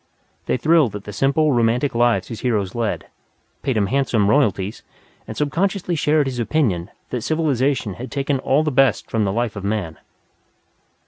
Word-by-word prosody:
They -, -, +1 dB
thrilled 150 Hz, -4 st, +3 dB
at 100 Hz, -, -6 dB
the 105 Hz, -, -8 dB
simple, 140 Hz, +7 st, +2 dB
romantic 120 Hz, +3 st, +1 dB
lives 115 Hz, -5 st, +2 dB
his 115 Hz, -, -6 dB
heroes 105 Hz, -7 st, -1 dB
led, 115 Hz, -2 st, -2 dB, 0.6 s
paid 130 Hz, -4 st, -1 dB
him 105 Hz, -, +2 dB
handsome 110 Hz, -3 st, +1 dB
royalties, 105 Hz, -7 st, +1 dB, 0.5 s
and -, -, -7 dB
subconsciously 180 Hz, +5 st, -1 dB
shared 150 Hz, -1 st, +2 dB
his 130 Hz, -2 st, -3 dB
opinion 110 Hz, -, 0 dB, 0.2 s
that 125 Hz, -, -2 dB
civilization 140 Hz, -, 0 dB
had 125 Hz, +7 st, -8 dB
taken 140 Hz, -1 st, -1 dB
all 140 Hz, +3 st, +2 dB
the 155 Hz, -, 0 dB
best 135 Hz, -3 st, +2 dB
from 110 Hz, -2 st, +1 dB
the 95 Hz, -, 0 dB
life 115 Hz, +1 st, -1 dB
of 100 Hz, -, -6 dB
man. 100 Hz, -6 st, -3 dB
125 Hz, 170 wpm, -21 LUFS, 105-145 Hz, 0.6 s, thrilled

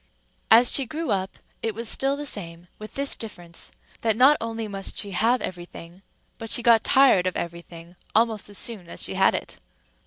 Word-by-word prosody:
As 235 Hz, +2 st, +7 dB
she 270 Hz, -3 st, +5 dB
grew 310 Hz, -1 st, -4 dB
up 190 Hz, -1 st, -2 dB, 0.2 s
it 225 Hz, -2 st, -3 dB
was 230 Hz, +1 st, -4 dB
still 270 Hz, +4 st, 0 dB
the 295 Hz, -, -6 dB
same, 175 Hz, -8 st, -4 dB
with 215 Hz, 0 st, -10 dB
this 280 Hz, 0 st, -1 dB
difference, 175 Hz, -6 st, -7 dB, 0.3 s
that 220 Hz, -2 st, 0 dB
not 270 Hz, +4 st, +6 dB
only 225 Hz, -1 st, -4 dB
must 195 Hz, -1 st, -5 dB
she 200 Hz, -, -4 dB
have 225 Hz, +6 st, +1 dB
every 175 Hz, -1 st, -5 dB
thing, 175 Hz, +1 st, -13 dB, 0.4 s
but 225 Hz, -, -7 dB
she 240 Hz, -, +4 dB
got 230 Hz, -3 st, +5 dB
tired 260 Hz, -10 st, +4 dB
of 185 Hz, -, -2 dB
every 170 Hz, 0 st, -5 dB
thing 170 Hz, +1 st, -13 dB, 0.2 s
almost 220 Hz, -2 st, +1 dB
as 205 Hz, -, -9 dB
soon 205 Hz, -8 st, -5 dB
as -, -, -3 dB
she -, -, -2 dB
had -, -, +3 dB
it. -, -, -6 dB
215 Hz, 205 wpm, -24 LUFS, 180-235 Hz, 0.4 s, As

